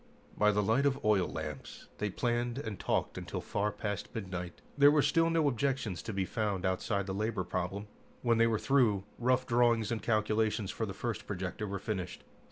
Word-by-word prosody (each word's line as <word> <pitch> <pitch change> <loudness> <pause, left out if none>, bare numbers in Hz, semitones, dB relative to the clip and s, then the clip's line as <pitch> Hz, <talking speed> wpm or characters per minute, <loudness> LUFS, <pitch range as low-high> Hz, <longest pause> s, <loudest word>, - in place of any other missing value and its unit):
By 105 - +4
the 105 0 +1
light 115 +8 +3
of 140 -2 -1
oil 105 -4 +4
lamps 75 -3 -7
they 105 - 0
planned 120 +3 -1
and 110 -8 -5
talked - - -1
until - - -5
far 105 +1 -1
past 105 0 -4
midnight. 90 -5 -5 0.2
There 145 0 +7
were 145 -1 +4
still 165 +3 +3
no 165 -2 +3
objections 130 -6 -1
to - - -5
be 95 -2 -1
found 100 -3 -1
outside 100 +2 0
the 95 - -3
labor 105 -1 -1
problem. 90 +3 -3 0.4
When 115 -2 +3
they 115 - +6
were 115 -1 +2
through, 115 -7 +3 0.2
rough 130 +1 +2
drawings 120 -2 +3
and 115 - -1
calculations 110 -1 +1
for 110 - -3
the 95 - -6
first 115 +2 -4
projector 95 +2 -3
were 100 0 -3
finished. 95 -3 -4
110 Hz, 190 wpm, -32 LUFS, 100-120 Hz, 0.4 s, There